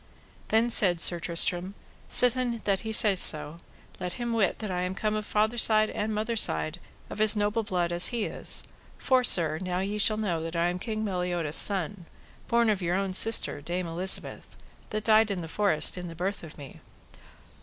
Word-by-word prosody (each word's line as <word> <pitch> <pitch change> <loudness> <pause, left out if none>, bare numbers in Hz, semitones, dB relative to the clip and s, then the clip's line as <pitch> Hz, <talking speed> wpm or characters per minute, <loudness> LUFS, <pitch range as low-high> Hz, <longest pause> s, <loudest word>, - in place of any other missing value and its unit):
Then 230 +2 0
said 180 -6 +5
Sir 175 0 +4
Tristram: 175 +3 +2 0.3
Sithen 250 -2 +2
that 195 -2 -1
he 220 - -6
saith 210 -3 +5
so, 155 0 -1 0.4
let 180 -1 -6
him 240 +2 -5
wit 210 -5 -1
that 215 -3 -7
I 180 0 -4
am 180 +1 -5
come 215 +1 -3
of 215 0 -5
father 220 +3 -1
side 215 -1 +3
and 215 +1 -5
mother 215 +2 -4
side 80 - +1 0.3
of 215 - -6
as 215 0 +6
noble 210 +2 -2
blood 180 -5 -4
as 175 +1 +4
he 235 -3 -4
is: - - -3 0.3
for, 260 -2 0
sir, 160 -8 +3
now 180 -1 -4 0.2
shall 215 +1 +1
ye 220 - -4
know 170 -5 -3
that 165 +1 -7
I 170 +1 -1
am 180 +1 -6
King 215 +1 -5
Meliodas' 180 -5 -3
son, 195 -2 +1 0.4
born 235 -1 +1
of 200 -2 -4
your 175 0 -2
own 195 -1 -3
sister, 220 -7 +3
Dame 175 +4 -5
Elizabeth, 175 +3 -2 0.3
that 215 0 -5
died 220 0 +2
in 195 -3 -5
the 165 - -8
forest 185 -1 -1
in 180 - -8
the 165 - -11
birth 190 +4 -5
of 160 -2 -13
me. 140 -3 -13
195 Hz, 195 wpm, -25 LUFS, 175-215 Hz, 0.4 s, as